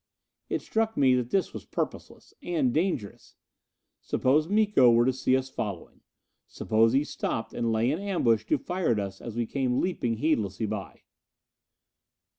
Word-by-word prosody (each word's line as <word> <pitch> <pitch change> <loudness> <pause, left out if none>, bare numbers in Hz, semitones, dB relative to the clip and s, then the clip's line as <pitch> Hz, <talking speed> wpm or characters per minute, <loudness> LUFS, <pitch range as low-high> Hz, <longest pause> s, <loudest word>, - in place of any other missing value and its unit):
It - - -2
struck 225 0 -1
me 130 -2 +5
that 125 -1 0
this 195 +5 0
was - - -7
purposeless - - -5
and 295 -8 0
dangerous. 160 - -2 0.7
Suppose 150 +5 +1
Miko 205 - +4
were 120 0 +4
to 130 - +2
see 130 0 +2
us 130 0 -3
following? 100 -8 -6 0.5
Suppose 115 +1 +1
he 135 +2 +3
stopped 115 -5 -4
and 115 -1 -1
lay 115 +3 +1
in 155 - -2
ambush 150 - +1
to - - +2
fire 180 -7 -1
at 105 - -1
us 100 -1 -5
as 115 -2 -7
we 120 0 0
came 130 +1 -1
leaping 120 -11 -1
heedlessly 110 - 0
by? 105 -2 -6
130 Hz, 160 wpm, -27 LUFS, 115-170 Hz, 0.7 s, me